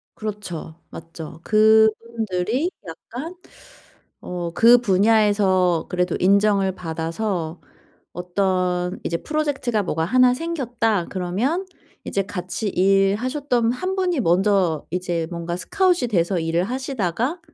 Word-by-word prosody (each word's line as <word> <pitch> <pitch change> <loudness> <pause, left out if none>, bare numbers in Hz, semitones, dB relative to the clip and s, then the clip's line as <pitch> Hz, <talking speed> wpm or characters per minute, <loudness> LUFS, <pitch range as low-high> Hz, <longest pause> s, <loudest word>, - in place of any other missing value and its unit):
그렇죠. 205 -7 -6
맞죠. 165 -1 -10
그분들이 220 - +2 0.2
약간 255 - -8 0.9
어 175 -1 -5
그 235 +2 +7
분야에서 195 -5 +2
그래도 180 -1 0
인정을 200 0 +3
받아서 165 +1 -3 0.5
어떤 180 0 -1
이제 170 - -1
프로젝트가 285 -8 -1
뭐가 160 -3 -1
하나 250 +5 +4
생겼다 245 - -1
그러면 215 - -1 0.4
이제 195 - -1
같이 185 +2 -4
일하셨던 225 +7 +1
1 370 +9 -3
분이 360 -6 0
먼저 185 -3 +2
이제 175 -2 -2
뭔가 170 0 -4
스카웃이 360 - +1
돼서 180 -3 +1
일을 165 +2 0
하시다가 255 - -2
200 Hz, 250 characters per minute, -22 LUFS, 180-240 Hz, 0.9 s, 그